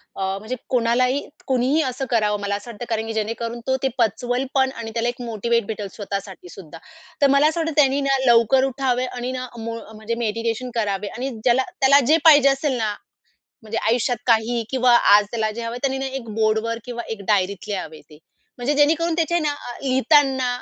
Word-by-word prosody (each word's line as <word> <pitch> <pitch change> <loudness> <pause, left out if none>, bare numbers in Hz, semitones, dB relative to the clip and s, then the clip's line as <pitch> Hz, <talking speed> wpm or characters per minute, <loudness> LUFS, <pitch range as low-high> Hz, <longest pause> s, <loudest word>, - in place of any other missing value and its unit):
अ, - - -6 0.2
म्हणजे 220 +5 -5
कोणालाही 250 +2 +2 0.3
कुणीही 265 +4 +2
असं 260 0 -3
करावं 210 -3 +1
मला 200 0 -1
असं 205 +4 -8
वाटतं. 235 +2 -8
कारण 225 -1 -2
की 225 - -4
जेणेकरून 230 +2 -3
तो 260 - +2
ते 270 - +3
पचवेल 245 +3 0
पण 265 -1 +2
आणि 230 -1 -6
त्याला 235 +1 0
एक 245 - -7
मोटिव्हेट 235 0 -1
भेटेल 210 -2 -4
स्वतःसाठी 195 -3 -6
सुद्धा. 165 -4 -11 0.4
तर 280 - +6
मला 280 +2 +5
असं 320 +2 -1
वाटतं, 325 -1 -1
त्यानी 275 0 +2
ना 275 -1 +2
लवकर 235 +2 +4
उठावे 260 -1 -1
आणि 250 0 -5
ना 255 0 -5
म्हणजे 230 0 -5
मो 220 - -14
म्हणजे 220 +2 -4
मेडिटेशन 230 +3 -2
करावे 205 -3 -1
आणि 260 +2 -3
ज्याला 255 +1 +3 0.2
त्याला 275 +1 +6
जे 315 +3 +5
पाहिजे 290 -3 +7
असेल 270 -1 0
ना, 215 -3 -1 0.7
म्हणजे 220 +1 -5
आयुष्यात 245 +1 +1
काहीही 230 0 +2
किंवा 250 -2 +4
आज 205 0 +5
त्याला 220 -2 -1
जे 235 +2 -6
हवंय, 230 +1 -4
त्यानी 270 -1 0
ना 270 - -3
एक 265 -3 -6
बोर्डवर 220 +1 0
किंवा 240 -1 -5
एक 225 -3 -5
डायरीत 200 -1 0
लिहावे 175 -7 -5
ते. 150 - -15 0.4
म्हणजे 255 +4 -1
जेणेकरून 320 +3 +2
त्याचे 330 0 0
आहे 345 - +2
ना 295 -1 0 0.3
लिहिताना 265 0 +3
240 Hz, 200 wpm, -22 LUFS, 220-265 Hz, 0.7 s, पाहिजे